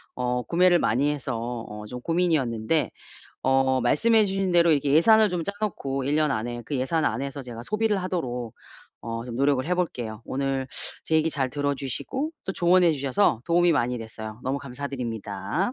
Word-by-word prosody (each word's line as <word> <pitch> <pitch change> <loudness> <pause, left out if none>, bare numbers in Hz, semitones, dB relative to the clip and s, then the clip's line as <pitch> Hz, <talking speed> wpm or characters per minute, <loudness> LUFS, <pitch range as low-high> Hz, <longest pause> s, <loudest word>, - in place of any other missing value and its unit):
어 125 0 -1
구매를 175 0 +4
많이 135 +7 +2
해서 130 -5 -3 0.3
어 105 0 -8
좀 125 +3 -7
고민이었는데 155 -5 +1 0.5
어 130 0 +3
말씀해 220 - +4
주신 195 -2 -1
대로 170 -1 +5
이렇게 145 -2 +2
예산을 220 +6 +6
좀 175 -2 -2
짜 200 - -3
놓고 135 -10 -2
1 140 +2 0
년 155 -1 +2
안에 120 0 -3
그 145 - -3
예산 150 +5 0
안에서 140 +4 -2
제가 120 -2 -8
소비를 215 - +1
하도록 125 -11 -3 0.5
어 115 0 -4
좀 120 -1 -6
노력을 140 -1 +2
해 180 - +1
볼게요. 120 -11 -3
오늘 135 -1 -2 0.4
제 160 - -1
얘기 160 +1 +2
잘 135 -4 0
들어 145 +1 -1
주시고 145 - -3
또 190 - -3
조언해 175 -1 +4
주셔서 140 - +1
도움이 175 0 +4
많이 125 -4 0
됐어요. 110 0 -8
너무 135 +2 -1
감사드립니다. 125 - -3
140 Hz, 360 characters per minute, -25 LUFS, 125-170 Hz, 0.5 s, 예산을